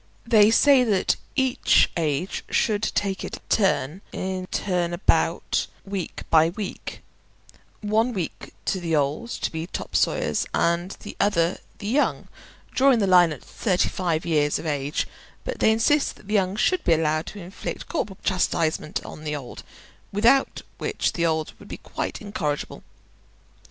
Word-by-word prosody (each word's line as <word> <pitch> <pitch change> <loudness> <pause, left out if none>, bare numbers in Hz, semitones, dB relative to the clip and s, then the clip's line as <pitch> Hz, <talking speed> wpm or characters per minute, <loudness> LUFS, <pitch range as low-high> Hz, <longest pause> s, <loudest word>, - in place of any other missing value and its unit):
They 220 -3 +6
say 265 +3 +6
that 205 -6 +2 0.2
each 260 -2 +3
age 160 +2 -1
should 210 -2 +1
take 195 -3 -1
it - - -6
turn 190 -5 +1
in 185 -1 -4
turn 180 -3 -1
about, 175 - +1 0.2
week 195 -3 -5
by 160 0 +6
week, 195 +2 -6 0.8
one 220 +3 +1
week 185 -8 -5
the 170 -4 0
old 150 +11 0
to - - -3
be 160 +1 -4
topsawyers, - - 0
and 170 +2 +1
the - - -8
other 175 -3 +2 0.2
the 205 - -9
young, 260 +8 0 0.4
drawing 270 -1 +4
the 210 - +2
line 180 -3 +6
at 150 - -7
thirty 185 -5 0
five 170 -3 -1
years 150 -3 +2
of - - -7
age; 145 -1 -1 0.4
but - - -5
they 220 - +5
insist 250 +7 +2
that 200 - -18
the 210 - -3
young 195 -2 +2
should 365 - +1
be 170 - +4
allowed 155 0 +1
to 205 - -8
inflict 180 +1 -6
corporal 210 - -3
chastisement 165 -4 0
on 155 - -9
the 150 -1 -2
old, 130 -4 -8 0.5
without 235 +7 +3 0.2
which - - -1
the 170 -1 +1
old 160 -1 -1
would - - -13
be - - -7
quite - - -5
incorrigible. 155 -9 -3
185 Hz, 150 wpm, -24 LUFS, 160-215 Hz, 0.8 s, They